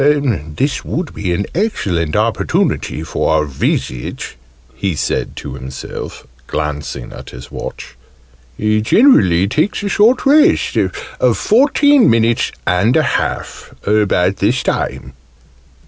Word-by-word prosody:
This 140 - -1
would 170 -1 -4
be 95 -3 -3
an 95 +3 -1
excellent 95 - -1
opportunity 75 - 0
for 80 -1 0
a - - -5
visit," 65 -2 -3 0.4
he 90 +6 -2
said 70 - -2
to - - -7
himself, 65 +1 -8 0.2
glancing 75 -4 -4
at - - -10
his 60 0 -11
watch: - - -7 0.6
"he 110 0 +1
generally 100 - +4
takes 155 - 0
a 200 - -1
short 225 +6 +3
rest 295 +2 +4
of - - -1
fourteen 280 +3 +4
minutes 115 0 +2
and 95 - +2
a 155 - +3 0.2
half - - -5
about 100 -3 +2
this 120 +6 +1
time." 65 - -3
105 Hz, 120 wpm, -16 LUFS, -, 0.6 s, generally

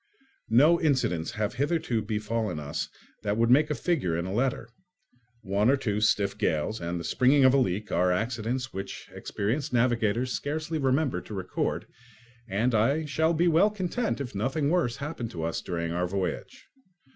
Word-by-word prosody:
No 150 +9 +5
incidents 130 - +1
have 105 -1 -2
hitherto 140 -3 0
befallen 105 -3 -2
us 75 0 -4 0.3
that 105 0 -1
would 115 +1 +3
make 150 +4 +5
a 150 - 0
figure 135 - 0
in 85 - -2
a 95 - -4
letter. 120 0 0 0.8
One 100 +4 +2
or 140 - +4
two 105 -5 -1
stiff 100 -2 +2
gales 90 +2 0
and 85 +1 -3
the - - -5
springing 130 - +4
of 130 - +6
a 140 - +5
leak 105 -3 -1
are 90 +1 +2
accidents 120 +5 -2
which 95 +1 -7
experienced 125 +9 -2
navigators 120 0 +1
scarcely 155 +2 -3
remember 135 - +1
to 105 - -8
record, 95 -1 -2 0.6
and 110 +5 0
I 135 +9 +2
shall 160 +3 +1
be 170 +3 +3
well 170 +5 +5
content 210 +2 -2
if 135 -4 -5
nothing 135 +8 0
worse 170 -10 +1
happen 140 -5 -5
to 80 - -6
us 80 0 -2
during 85 -2 -3
our 90 +1 0
voyage. 95 0 -4
115 Hz, 170 wpm, -27 LUFS, 100-140 Hz, 0.8 s, of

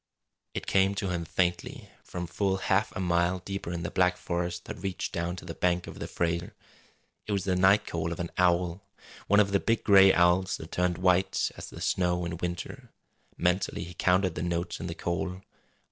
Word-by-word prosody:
It - - -3
came 95 +1 +3
to 100 -2 -2
him 85 -2 -2
faintly, 90 +1 -2
from 90 -1 -5
full 95 +3 0
half 95 +2 +1
a - - -3
mile 90 0 +1
deeper 95 -1 -5
in 85 -1 -4
the - - -3
black 90 -1 +2
forest 85 0 -3
that - - -7
reached 95 -1 -3
down 85 +1 -2
to 90 - -10
the 85 - -5
bank 90 0 0
of - - -9
the - - -4
Frazer. 85 0 -2 0.7
It 105 - -1
was 100 -2 0
the 95 -1 0
night 95 +3 +4
call 85 0 -3
of 85 - -5
an 85 -1 -3
owl 90 0 +2 0.5
one 100 +1 +5
of 100 -1 +3
the 100 - +3
big 115 +2 0
gray 95 -2 +7
owls 90 +1 +3
that 80 - -10
turned 90 -1 0
white 90 +1 +2
as - - -8
the - - -10
snow 90 -1 +1
in 85 0 -4
winter. 90 0 -5 0.5
Mentally 90 0 0
he 90 +1 -9
counted 90 +1 +2
the - - -4
notes 85 0 -2
in - - -4
the - - -5
call. 90 +2 -3
90 Hz, 205 wpm, -28 LUFS, 85-95 Hz, 0.7 s, gray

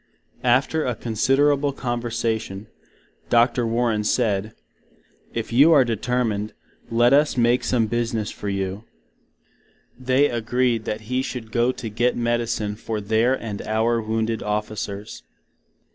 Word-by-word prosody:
After 135 +6 +2
a 125 - -1
considerable 135 +6 +1
conversation, 115 -5 -3 0.6
Dr. 120 0 +3
Warren 115 -2 0
said, 105 -2 0 0.8
If 115 0 -4
you 145 +7 +6
are 140 -4 +6
determined, 115 -2 -1 0.4
let 120 +2 +4
us 145 -1 +3
make 120 +1 +3
some 120 -3 +1
business 115 -1 -2
for 105 - -5
you. 95 +1 -3 1.2
They 130 +3 +3
agreed 120 -1 0
that 105 +1 -3
he 125 +4 -1
should 125 -4 -6
go 120 +1 +2
to 120 -3 -7
git 115 +3 0
medicine 115 -3 -1
for 110 -1 -4
their 110 +5 +2
and 105 -3 -5
our 115 +2 0
Wounded 110 0 -1
officers. 105 -1 -4
115 Hz, 125 wpm, -23 LUFS, 110-125 Hz, 1.2 s, you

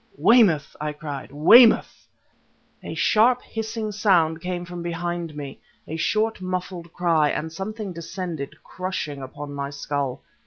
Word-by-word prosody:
"Weymouth!" 205 - +4
I 150 0 -2
cried. 145 -3 -7
"Weymouth!" 220 - +6 0.7
A - - -7
sharp 240 +3 +3
hissing 220 -1 -4
sound 170 -6 +2
came 180 0 -4
from 175 0 -7
behind 170 -1 -4
me; 140 -2 -7 0.3
a 160 - -5
short, 215 +5 0
muffled 180 -2 -4
cry... 165 -4 +2
and 160 +2 -3
something 205 +2 -5
descended, 170 -3 -6
crushing, 180 -6 -5
upon 145 +2 -8
my 140 0 -4
skull. 140 -2 -3
170 Hz, 130 wpm, -24 LUFS, 150-195 Hz, 0.7 s, Weymouth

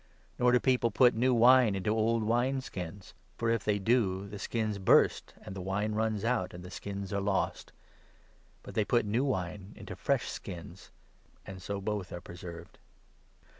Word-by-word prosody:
Nor 125 0 +4
do 125 - +5
people 125 -3 +2
put 125 +3 +5
new 125 +3 +2
wine 120 -2 +6
into 95 +2 -1
old 115 +1 +1
wine 120 +4 +1
17 - - -5
skins; 95 -4 -8 0.2
for, 115 -1 0
if 115 -3 0
they 105 -1 +1
do, 100 -3 +1
the 100 0 -8
skins 110 -2 -2
burst, 95 - +3
and 95 - -8
the 95 - -5
wine 100 +3 -1
runs 110 -1 -1
out, 115 -8 0
and 90 - -9
the 90 - -10
skins 100 0 -6
are 100 - 0
lost; 100 -1 -1 0.9
but - - -10
they 110 - +2
put 120 +2 +1
new 110 +5 +1
wine 100 -5 -3
into - - -8
fresh 130 -5 0
skins, 85 -4 -8 0.6
and 95 -1 -9
so 100 +2 -4
both 100 -2 -3
are 85 - -5
preserved." 85 -1 -10
105 Hz, 180 wpm, -30 LUFS, 95-115 Hz, 0.9 s, wine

